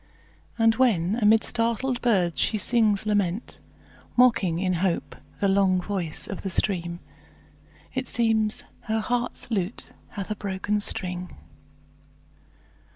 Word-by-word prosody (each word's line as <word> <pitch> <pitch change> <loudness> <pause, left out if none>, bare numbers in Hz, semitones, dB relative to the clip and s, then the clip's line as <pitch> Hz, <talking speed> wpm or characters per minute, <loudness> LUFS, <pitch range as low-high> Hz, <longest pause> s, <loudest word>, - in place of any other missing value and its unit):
And 225 -1 +4
when 215 -6 +2
amid 220 +1 +5
startled 240 +2 0
birds 185 -8 +1
she 220 - +1
sings 215 -1 +2
lament, 205 0 -1 0.6
Mocking 225 -9 +4
in 185 +1 0
hope 185 -3 -1 0.2
the 200 - +2
long 195 -1 +3
voice 180 -4 -2
of 195 - -6
the 195 - -3
stream, 175 -2 0 0.9
It 260 -1 -3
seems 220 -2 +1 0.2
her 220 0 0
heart's 245 +1 -2
lute 195 -1 -3 0.2
hath 200 0 -5
a - - -1
broken 200 +1 -2
string. 180 -3 -3
205 Hz, 120 wpm, -25 LUFS, 185-225 Hz, 0.9 s, amid